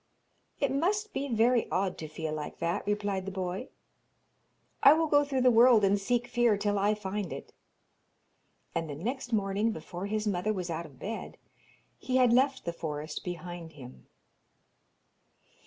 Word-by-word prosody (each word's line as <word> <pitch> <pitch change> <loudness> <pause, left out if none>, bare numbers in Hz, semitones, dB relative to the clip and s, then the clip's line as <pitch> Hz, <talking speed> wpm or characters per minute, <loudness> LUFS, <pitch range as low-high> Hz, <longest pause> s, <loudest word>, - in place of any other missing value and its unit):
'It 280 -2 +1
must 410 +10 0
be 280 - -2
very 235 0 +2
odd 190 0 0
to 155 - -7
feel 155 0 -4
like 150 -1 -5
that,' 170 +4 -1
replied 205 -2 -1
the - - -3
boy. 185 +4 -4 1.1
'I 280 - +9
will 325 +1 +2
go 290 -2 +4
through 275 -2 -1
the 250 0 +6
world 235 -1 +6
and 200 +1 +3
seek 240 +4 0
fear 240 -3 +2
till 205 0 0
I 205 +2 +2
find 200 -2 -4
it.' - - -8 1.2
And 165 -1 -2
the 145 - -4
next 245 - -4
morning, 205 +1 +1
before 175 +1 -6
his 215 +1 -1
mother 205 +2 0
was 180 -3 -4
out 165 +1 -4
of 140 -4 -18
bed, 220 - -6 0.6
he 255 - -2
had 250 -2 +5
left 265 +2 +2
the 170 - -2
forest 150 -2 -5
behind 175 -1 -6
him. 130 -3 -13
205 Hz, 165 wpm, -30 LUFS, 175-245 Hz, 1.2 s, I